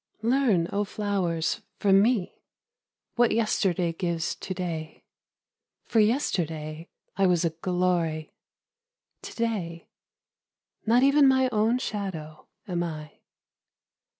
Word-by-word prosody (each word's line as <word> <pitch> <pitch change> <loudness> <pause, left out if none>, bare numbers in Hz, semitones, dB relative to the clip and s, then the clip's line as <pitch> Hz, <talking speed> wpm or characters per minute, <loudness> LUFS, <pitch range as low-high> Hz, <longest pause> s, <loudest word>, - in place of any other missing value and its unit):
Learn 230 -8 +2
oh 205 +1 +1
flowers 195 -6 -1 0.2
from 195 -1 +4
me 215 -4 0 0.8
What 240 -1 +5
yesterday 190 -6 +1
gives 170 -1 -2
to 190 - -6
day 165 -3 -5 0.4
— - - -63
For 225 - +1
yesterday 165 - 0 0.3
I 195 -1 +4
was 175 -1 +2
a 165 - +1
glory, 170 -2 -1 0.9
To - - -9
day 195 -8 -3 1.0
not 240 +3 +5
even 280 +1 +6
my 260 -1 +4
own 220 +3 +2
shadow 190 -10 -5 0.2
am 175 -3 -1
I. 155 -3 -6
185 Hz, 110 wpm, -26 LUFS, 165-220 Hz, 1.0 s, even